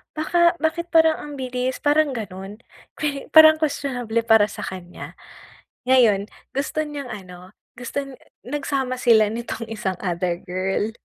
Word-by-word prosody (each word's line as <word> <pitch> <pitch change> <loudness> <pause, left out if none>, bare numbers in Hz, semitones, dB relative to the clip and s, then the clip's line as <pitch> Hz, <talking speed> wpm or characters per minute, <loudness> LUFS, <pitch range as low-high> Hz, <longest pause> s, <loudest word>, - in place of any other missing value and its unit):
baka, 340 +2 +2
bakit 340 +2 -1
parang 320 -2 +4
ang 295 - -8
bilis", 255 -1 -3
parang 290 -1 +2
ganun. 195 -2 -7 0.4
Kwe 285 -2 -3
parang 315 0 +9
kwestionable 250 -7 -1
para 225 -2 +5
sa - - -8
kanya. 180 -2 -8 0.7
Ngayon 235 -6 +4 0.2
gusto 285 +3 -2
niyang 295 -2 -5
ano, 185 -2 -11 0.2
guston 270 +2 -5 0.2
nagsama 270 -1 -3
sila 225 -4 +4
nitong 230 0 -5
isang 210 -4 -3
other 175 -1 -2
girl, 190 +3 -2
250 Hz, 130 wpm, -22 LUFS, 205-290 Hz, 0.7 s, parang